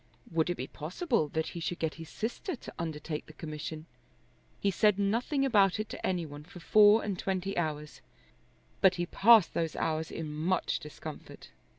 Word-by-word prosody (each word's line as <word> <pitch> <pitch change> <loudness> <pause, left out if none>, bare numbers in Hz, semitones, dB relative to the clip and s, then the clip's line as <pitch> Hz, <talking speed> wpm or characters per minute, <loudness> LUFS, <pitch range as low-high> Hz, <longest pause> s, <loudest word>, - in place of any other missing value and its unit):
Would 165 0 +1
it 175 - 0
be 130 - -3
possible 175 - -1
that 160 +2 -2
he 170 - -7
should 170 +1 -3
get 160 -1 -1
his 165 - -9
sister 245 - -4
to - - -11
undertake 155 -2 -4
the 155 - -12
commission? 155 0 -6 0.7
He 200 - +1
said 210 +1 +3
nothing 235 +8 +1
about 205 -6 +4
it 215 - -3
to - - -8
any 180 -3 0
one 145 -1 -9
for 175 +3 -12
four 210 +4 +6
and 195 -3 -3
twenty 195 +1 -2
hours; 150 -3 -3 0.8
but 190 -1 +6
he 175 0 -1
passed 220 +1 +5
those 165 -1 -1
hours 160 0 -1
in 155 -2 -5
much 170 +4 0
discomfort. 150 -1 -10
175 Hz, 180 wpm, -30 LUFS, 155-200 Hz, 0.8 s, four